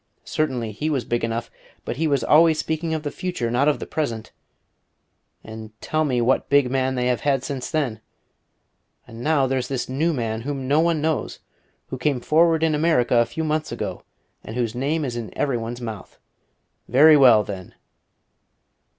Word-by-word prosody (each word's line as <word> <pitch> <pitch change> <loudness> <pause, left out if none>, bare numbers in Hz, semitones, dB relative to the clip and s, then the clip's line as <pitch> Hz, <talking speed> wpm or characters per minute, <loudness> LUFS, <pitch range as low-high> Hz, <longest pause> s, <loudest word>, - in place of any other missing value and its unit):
Certainly 125 -7 -2
he 150 +10 -3
was 135 -6 -1
big 120 0 -1
enough; 115 0 -3 0.3
but 120 - -4
he 160 +2 +1
was 140 -5 +1
always 160 +4 +5
speaking 160 +1 -2
of 155 - -4
the 145 - -3
future, 175 -11 -3
not 130 +4 +2
of 150 - +3
the - - -6
present; 115 -8 -3 1.1
and 110 0 -10
tell 155 0 -1
me 125 -4 0
what 125 +3 +1
big 140 -3 +3
man 130 0 0
they 125 -1 -1
have 125 -1 0
had 135 -3 +1
since 135 -3 -4
then! 130 -9 -2 1.0
And 115 +1 -11
now 150 -1 +2
there's 130 -1 -1
this 135 -3 -3
new 150 +6 0
man, 115 -6 -2
whom 135 0 -4
no 145 +3 +3
one 165 -2 +2
knows, 160 0 -1 0.5
who 130 - -5
came 140 -2 0
forward 160 +4 +3
in 160 -1 +2
America 150 -6 +2
a 120 0 +4
few 160 +7 -4
months 155 0 -1
ago, - - -4 0.4
and 110 - -8
whose 120 -3 -1
name 145 +5 -1
is 120 -3 -4
in 115 -2 -7
every 135 -4 0
one's 120 +2 -5
mouth. 110 -5 -7 0.7
Very 150 +6 +7
well, 125 -7 +6
then!" 95 -3 -8
135 Hz, 185 wpm, -23 LUFS, 120-155 Hz, 1.1 s, Very